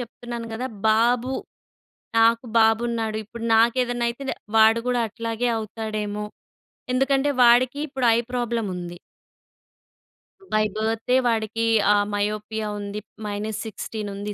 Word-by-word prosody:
చెప్తున్నాను 235 0 -7
గదా! 255 +3 -3 0.2
బాబు, 240 +3 +2 0.8
నాకు 230 +2 +4
బాబున్నాడు. 225 0 +2
ఇప్పుడు 230 +2 -8
నాకేదన్నైతే 240 +1 +1
దె - - -2 0.2
వాడు 220 +1 +6
గూడా 245 -1 +1
అట్లాగే 230 +2 -2
అవుతాడేమో. 215 -1 -4 0.7
ఎందుకంటే, 270 +2 +2
వాడికి 245 +3 +5
ఇప్పుడు 265 -3 -1
ఐ - - +2
ప్రాబ్లముంది. 205 -8 -3 1.6
బై 215 0 +3
బర్తే 225 +3 0
వాడికి 225 0 0 0.3
ఆ - - +4 0.2
మయోపియా 210 +1 -2
ఉంది. 205 +1 -5 0.3
-16 215 0 -5
ఉంది 205 +1 -5
225 Hz, 105 wpm, -24 LUFS, 215-240 Hz, 1.6 s, వాడు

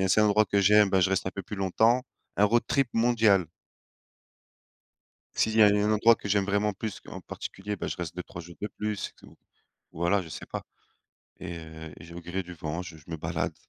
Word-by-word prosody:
a 95 - +2
un - - -1
certain 105 +3 +5
endroit 105 +1 +4
que 100 - +2
j'aime, 105 +1 +6
bah, 95 0 +3
je 95 - +2
reste 95 0 0
un - - 0
peu 100 - -4
plus 105 - -7
longtemps. 110 +6 +3 0.4
Un 105 - +6
road 120 +3 +3
trip 135 -3 +2
mondial. 115 -5 +4 1.9
S'il 110 0 +1
y 110 - +7
a - - +9
un 105 +1 +3
endroit 115 +2 +6
que 100 - -7
j'aime 100 -1 +2
vraiment 100 +1 +1
plus, 105 0 -6
en - - -7
particulier, 105 +2 -6
bah - - -4
je - - -4
reste 85 -1 -5
2-3 90 -1 -7
jours 85 +1 -12
de 105 - -1
plus 105 -1 -4
c'est - - -5
tout, - - -17 0.6
voilà. 85 +4 +1
Je 85 - -10
sais 75 - -7
pas, - - -5 0.8
et 85 -2 -6
heu 80 -1 -10
et - - -12
je 85 - -13
vais 85 - -7
au - - -13
gré 90 +3 -3
du 90 0 -9
vent, 80 +2 -4
je 85 -2 -9
je 75 - -17
me 80 - -4
balade. - - -2
100 Hz, 235 wpm, -28 LUFS, 85-105 Hz, 1.9 s, a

